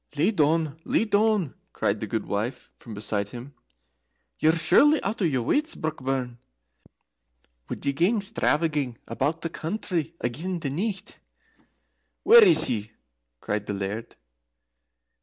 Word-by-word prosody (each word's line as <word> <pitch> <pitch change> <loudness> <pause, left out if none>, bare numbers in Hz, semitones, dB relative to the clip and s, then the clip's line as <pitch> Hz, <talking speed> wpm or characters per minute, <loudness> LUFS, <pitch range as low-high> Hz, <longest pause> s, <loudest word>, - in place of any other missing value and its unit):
"Lie 155 - +3
doun, 155 -4 +1
lie - - +1
doun," 210 - +1 0.2
cried - - 0
the - - -4
gudewife 105 +5 -3
from 115 -3 -11
beside 105 0 -2
him. 120 +6 -10 0.9
"Ye're 160 +2 +3
surely 285 - +5
out 205 +2 -3
o' - - +3
your 130 -7 0
wuts, 305 - +1
Brockburn. 130 -5 -3 1.3
Would - - -5
ye 140 - +1
gang 180 +10 +2
stravaging 150 - 0
about 145 +8 -2
the 165 - -2
country 170 -2 -3
again 160 +10 -3
the 140 -4 -3
nicht?" 195 +6 -4 1.0
"Where 465 0 +9
is 360 -5 +6
he?" 110 -4 -1 0.5
cried 105 0 -3
the 105 - -2
Laird. 100 +4 -5
155 Hz, 130 wpm, -25 LUFS, 120-190 Hz, 1.3 s, Where